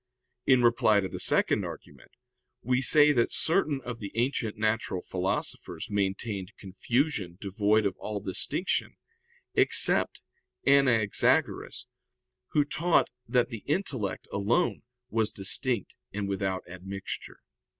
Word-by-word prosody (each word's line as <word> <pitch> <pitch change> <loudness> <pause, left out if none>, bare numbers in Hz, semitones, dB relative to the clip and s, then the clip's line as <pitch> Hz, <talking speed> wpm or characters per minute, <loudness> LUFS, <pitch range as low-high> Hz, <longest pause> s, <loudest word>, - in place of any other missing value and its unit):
In 130 -2 +5
reply 115 -3 +4
to 95 - -2
the - - -7
second - - +2
argument, - - -10 0.5
we 125 +2 +1
say 150 +3 +7
that 120 -5 +1
certain 155 -5 +1
of 120 -1 -6
the 100 -2 -7
ancient 120 -3 -1
natural 110 -4 -1
philosophers 95 +3 -3
maintained 100 0 -2
confusion 100 - -2
devoid 105 +2 +1
of 95 -2 -1
all 105 -1 -4
distinction; 100 - -1 0.6
except - - +3 0.4
Anaxagoras, 130 -7 +2 0.6
who 145 -1 +1
taught 165 +4 +1 0.2
that 125 -2 +2
the 115 -4 -7
intellect 135 - -2
alone 100 +4 0 0.3
was 110 -1 +1
distinct 100 +3 0 0.2
and 100 0 -3
without 95 -1 -2
admixture. 95 +2 -8
110 Hz, 115 wpm, -28 LUFS, 100-130 Hz, 0.6 s, say